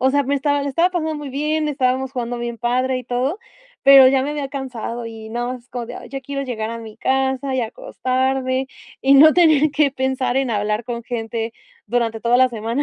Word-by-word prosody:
O 260 Hz, +1 st, +3 dB
sea, 285 Hz, +1 st, +2 dB
me 280 Hz, +2 st, 0 dB
estaba 285 Hz, 0 st, 0 dB
la 280 Hz, -, -2 dB
estaba 335 Hz, +6 st, +2 dB
pasando 320 Hz, -3 st, -2 dB
muy 295 Hz, -1 st, -6 dB
bien, 300 Hz, +3 st, -1 dB
estábamos 260 Hz, -2 st, 0 dB
jugando 245 Hz, -2 st, -3 dB
bien 235 Hz, 0 st, -4 dB
padre, 255 Hz, +2 st, 0 dB
y 250 Hz, -, -8 dB
todo, 250 Hz, -, -1 dB, 0.4 s
pero 275 Hz, -1 st, +9 dB
ya 265 Hz, 0 st, +2 dB
me 285 Hz, -, -2 dB
había 290 Hz, -2 st, -3 dB
cansado, 250 Hz, -4 st, -5 dB
y 220 Hz, -1 st, -9 dB
nada 240 Hz, +1 st, -2 dB
más 250 Hz, -1 st, -6 dB
es -, -, -33 dB
como 245 Hz, -1 st, -4 dB
de: -, -, -9 dB
"Ya 270 Hz, 0 st, -5 dB
quiero 275 Hz, +1 st, -4 dB
llegar 225 Hz, -4 st, -4 dB
a 230 Hz, -, -5 dB
mi 220 Hz, -1 st, -10 dB
casa, 265 Hz, +2 st, 0 dB
y 260 Hz, -, +1 dB
acostarme, 260 Hz, +3 st, -1 dB, 0.4 s
y 270 Hz, -, +4 dB
no 310 Hz, +3 st, +8 dB
tener 310 Hz, -4 st, +4 dB
que 290 Hz, -1 st, +3 dB
pensar 265 Hz, -1 st, -1 dB
en 270 Hz, -2 st, 0 dB
hablar 210 Hz, +1 st, -1 dB
con 235 Hz, 0 st, -5 dB
gente 225 Hz, -1 st, -4 dB, 0.3 s
durante 230 Hz, -2 st, -1 dB
toda 235 Hz, +2 st, +3 dB
la 255 Hz, 0 st, +5 dB
semana". 230 Hz, +3 st, -2 dB
260 Hz, 220 wpm, -20 LUFS, 240-275 Hz, 0.4 s, pero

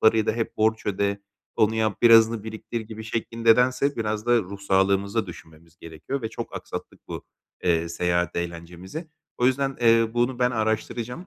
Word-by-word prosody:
parayı 110 Hz, -1 st, +4 dB
da -, -, +2 dB
"Hep 115 Hz, 0 st, -3 dB
borç 110 Hz, +1 st, +1 dB
öde, 100 Hz, 0 st, 0 dB, 0.4 s
onu 110 Hz, +1 st, +3 dB
yap, 110 Hz, -1 st, -1 dB
birazını 115 Hz, -2 st, +6 dB
biriktir." 110 Hz, +1 st, -5 dB
gibi 110 Hz, 0 st, -9 dB
şeklinde 115 Hz, +1 st, +2 dB
dense 130 Hz, +3 st, +2 dB
biraz 110 Hz, 0 st, -2 dB
da 120 Hz, 0 st, +5 dB
ruh 100 Hz, -1 st, -6 dB
sağlığımızı 100 Hz, +2 st, +1 dB
da -, -, -13 dB
düşünmemiz 80 Hz, -1 st, -13 dB
gerekiyor 85 Hz, -, -6 dB
ve 110 Hz, -, -2 dB
çok -, -, -7 dB
aksattık -, -, -8 dB
bu, -, -, -6 dB, 0.4 s
eee, 85 Hz, -1 st, +2 dB
seyahat 85 Hz, +1 st, 0 dB
eğlencemizi. 85 Hz, -, -6 dB, 0.3 s
O 125 Hz, -, +3 dB
yüzden, 135 Hz, +1 st, +1 dB
eee, 115 Hz, -1 st, +5 dB
bunu 120 Hz, +1 st, +1 dB
ben 125 Hz, 0 st, +3 dB
araştıracağım. 115 Hz, -, -2 dB
110 Hz, 170 wpm, -25 LUFS, 95-115 Hz, 0.4 s, birazını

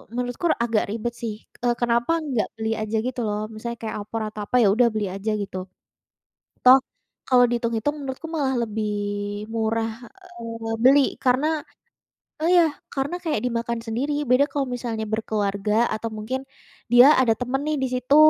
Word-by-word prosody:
menurutku 245 Hz, +6 st, -3 dB
r -, -, +2 dB
agak 230 Hz, -2 st, +1 dB
ribet 230 Hz, +2 st, -3 dB
sih. 225 Hz, -3 st, -4 dB, 0.3 s
Eee, 240 Hz, -1 st, +2 dB
kenapa 240 Hz, +7 st, +2 dB
nggak 265 Hz, -8 st, -1 dB
beli 220 Hz, 0 st, -1 dB
aja 215 Hz, 0 st, -2 dB
gitu 255 Hz, 0 st, -3 dB
loh, 210 Hz, +1 st, -2 dB
misalnya 235 Hz, +2 st, -5 dB
kayak 220 Hz, -, -4 dB
opor 225 Hz, +2 st, -4 dB
atau 215 Hz, 0 st, -7 dB
apa, 250 Hz, -, -3 dB
ya 205 Hz, -, +5 dB
udah 240 Hz, +1 st, +5 dB
beli 215 Hz, -2 st, -1 dB
aja 195 Hz, +3 st, -3 dB
gitu. 190 Hz, -2 st, -4 dB, 1.0 s
Toh, 260 Hz, +2 st, +9 dB, 0.5 s
kalau 250 Hz, -1 st, +6 dB
dihitung-hitung 235 Hz, +3 st, -1 dB
menurutku 270 Hz, +4 st, -5 dB
malah 285 Hz, -5 st, 0 dB
lebih 215 Hz, 0 st, -2 dB, 0.6 s
murah, 225 Hz, 0 st, 0 dB, 0.5 s
eee, 230 Hz, -1 st, -5 dB
beli 275 Hz, +3 st, +7 dB, 0.2 s
karena 295 Hz, +4 st, +2 dB, 0.8 s
oh, 325 Hz, -, +2 dB
ya, 340 Hz, -4 st, +5 dB, 0.2 s
karena 285 Hz, +5 st, -2 dB
kayak 310 Hz, -3 st, 0 dB
dimakan 235 Hz, -1 st, -1 dB
sendiri. 280 Hz, +6 st, -2 dB
Beda 255 Hz, +3 st, +5 dB
kalau 280 Hz, -2 st, 0 dB
misalnya 235 Hz, -3 st, -3 dB
berkeluarga 210 Hz, 0 st, 0 dB
atau 220 Hz, +1 st, -3 dB
mungkin 220 Hz, +5 st, -4 dB, 0.5 s
dia 245 Hz, +5 st, +9 dB
ada 235 Hz, -3 st, +4 dB
temen 250 Hz, +2 st, -1 dB
nih 305 Hz, -1 st, 0 dB
di 265 Hz, -, +1 dB
situ 255 Hz, +3 st, +2 dB
235 Hz, 165 wpm, -24 LUFS, 220-265 Hz, 1.0 s, Toh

